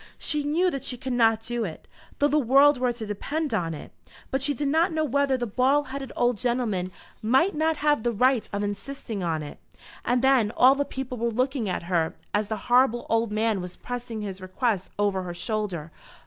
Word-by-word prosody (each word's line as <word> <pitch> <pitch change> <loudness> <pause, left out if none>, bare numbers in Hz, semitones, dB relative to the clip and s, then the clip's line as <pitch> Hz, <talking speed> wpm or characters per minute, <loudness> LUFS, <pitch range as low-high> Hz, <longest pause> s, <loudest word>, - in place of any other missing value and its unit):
She 300 -1 -1
knew 335 +5 +2
that 275 -3 -4
she 250 -2 -4
could 255 +1 -4
not 225 -2 +3
do 240 +1 -2
it, 165 -7 -7 0.3
though 290 - +3
the 300 +1 +2
world 275 +2 +5
were 250 -1 +2
to 235 -2 -6
depend 285 +8 -3
upon 165 -6 -1
it; 145 - -10 0.4
but 270 - 0
she 285 +1 +1
did 290 - -1
not 325 +5 +2
know 315 -1 0
whether 280 -1 +1
the 245 - -2
bald 260 +5 +2
headed 270 0 -6
old 245 -3 +1
gentleman 235 -7 -1 0.3
might 265 - +3
not 315 +1 +1
have 295 -4 +2
the 240 +1 0
right 250 +2 +2
of 200 0 -2
insisting 210 +1 -5
on 160 -3 -1
it. 145 - -9 0.4
And 245 +1 +1
then 265 -5 +4
all 255 +2 +7
the 285 +1 -1
people 260 -3 -5
were 235 +1 +1
looking 250 -1 -1
at 180 - -2
her 170 -2 0 0.2
as 210 0 +1
the 220 - -2
horrible 245 -1 +3
old 225 -1 +2
man 215 -2 0
was 180 0 -7
pressing 245 -3 -5
his 195 -2 -6
request 190 +1 -1
over 200 -2 +1
her 175 -1 -6
shoulder. 185 -6 -3
240 Hz, 210 wpm, -26 LUFS, 210-275 Hz, 0.4 s, all